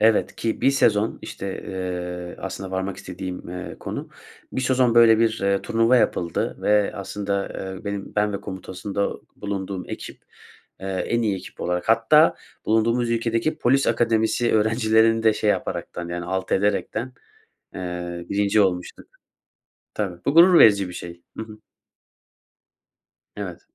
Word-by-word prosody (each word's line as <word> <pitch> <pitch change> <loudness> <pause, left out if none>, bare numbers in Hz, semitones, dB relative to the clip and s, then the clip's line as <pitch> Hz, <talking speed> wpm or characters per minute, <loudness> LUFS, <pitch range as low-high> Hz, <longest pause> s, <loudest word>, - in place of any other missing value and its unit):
Evet. 110 0 +3
Ki 115 - -2
bir - - +4
sezon, 110 -5 +2
işte, 95 -1 -6
eee, 90 -1 -5
aslında 95 -1 -6
varmak 95 +1 -3
istediğim, 90 -1 -7
eee, 90 +1 -6
konu. - - -5 0.4
Bir - - -1
sezon 130 -2 +2
böyle 115 -2 +7
bir, 115 -1 +2
eee, 100 0 +1
turnuva 115 +2 +3
yapıldı 85 -7 0
ve 105 -1 +3
aslında, 100 0 -3
eee, 95 +1 -7
benim 100 -1 -5
ben 105 0 +2
ve 100 - -4
komutasında 95 +1 -4 0.3
bulunduğum 100 -2 -4
ekip, - - -8 0.6
eee, 95 - -6
en 95 +5 -1
iyi 105 -4 +1
ekip 95 - -11
olarak 90 +2 -2
hatta 115 +8 +5 0.3
bulunduğumuz 115 +2 +2
ülkedeki 115 +6 0
polis 135 0 +3
akademisi 115 0 +2
öğrencilerini 110 +1 +3
de 110 -1 +5
şey 105 0 +1
yaparak, - - -2
yani 85 0 -4
alt 95 +1 -3
ederek, 100 +1 +1 0.9
eee, 90 -1 -5
1. 100 +1 +2
olmuştuk. 90 -2 -2 0.9
Tabii, 95 -5 -3
bu - - +2
gurur 170 +2 +8
verici 100 -3 +6
bir 90 - -9
şey. 85 0 -8 0.2
Hı - - -3
hı. 110 -1 -12 1.8
Evet. 95 -4 -6
105 Hz, 140 wpm, -23 LUFS, 95-115 Hz, 1.8 s, gurur